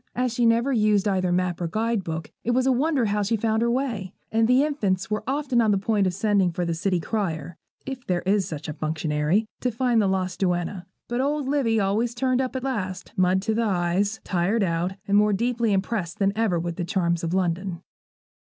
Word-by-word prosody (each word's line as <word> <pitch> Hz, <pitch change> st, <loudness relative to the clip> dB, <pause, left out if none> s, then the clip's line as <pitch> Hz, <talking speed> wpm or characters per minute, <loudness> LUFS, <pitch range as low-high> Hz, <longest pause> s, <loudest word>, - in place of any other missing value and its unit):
As 250 Hz, -1 st, 0 dB
she 240 Hz, -1 st, +2 dB
never 235 Hz, +4 st, +2 dB
used 210 Hz, -3 st, +3 dB
either 185 Hz, -2 st, +1 dB
map 180 Hz, -1 st, 0 dB
or 170 Hz, -, 0 dB
guide 220 Hz, +3 st, -1 dB
book, 160 Hz, -2 st, -5 dB
it 240 Hz, +1 st, +1 dB
was 255 Hz, 0 st, +2 dB
a 265 Hz, -, +4 dB
wonder 270 Hz, 0 st, +1 dB
how 210 Hz, 0 st, 0 dB
she 205 Hz, +3 st, +1 dB
found 220 Hz, +1 st, 0 dB
her 235 Hz, -, +2 dB
way; 235 Hz, -7 st, -2 dB, 0.2 s
and 225 Hz, 0 st, +3 dB
the 250 Hz, +3 st, +4 dB
infants 210 Hz, -12 st, -1 dB
were 210 Hz, -, -1 dB
often 270 Hz, -3 st, +1 dB
on 220 Hz, -, +2 dB
the 200 Hz, -, +3 dB
point 200 Hz, 0 st, +1 dB
of 180 Hz, -, -1 dB
sending 200 Hz, -3 st, +2 dB
for 175 Hz, +1 st, -2 dB
the 170 Hz, -, -1 dB
city 180 Hz, +2 st, 0 dB
crier, 165 Hz, -4 st, -3 dB, 0.3 s
if 265 Hz, -2 st, -7 dB
there 180 Hz, -1 st, 0 dB
is 195 Hz, +1 st, +1 dB
such 155 Hz, -1 st, -6 dB
a 150 Hz, -, -4 dB
functionary, 155 Hz, +5 st, 0 dB
to 250 Hz, -, 0 dB
find 240 Hz, -1 st, +2 dB
the 200 Hz, -, +2 dB
lost 185 Hz, -1 st, -1 dB
duenna. 180 Hz, 0 st, -1 dB, 0.2 s
But 240 Hz, +1 st, -1 dB
old 290 Hz, 0 st, -1 dB
Livy 260 Hz, -6 st, +2 dB
always 215 Hz, +4 st, 0 dB
turned 255 Hz, +1 st, +1 dB
up 260 Hz, 0 st, -3 dB
at 260 Hz, -, -3 dB
last, 190 Hz, -9 st, -4 dB
mud 185 Hz, +1 st, +2 dB
to 220 Hz, -, 0 dB
the 230 Hz, -, +1 dB
eyes, 200 Hz, +1 st, 0 dB
tired 195 Hz, +5 st, +1 dB
out, 175 Hz, +1 st, 0 dB
and 200 Hz, -, +2 dB
more 210 Hz, 0 st, +4 dB
deeply 235 Hz, +1 st, 0 dB
impressed 190 Hz, -2 st, -1 dB
than 195 Hz, -1 st, +1 dB
ever 215 Hz, -5 st, +1 dB
with 170 Hz, 0 st, -3 dB
the 175 Hz, -, -2 dB
charms 170 Hz, -3 st, 0 dB
of 165 Hz, +2 st, -1 dB
London. 180 Hz, -1 st, -1 dB
205 Hz, 220 wpm, -25 LUFS, 180-235 Hz, 0.3 s, a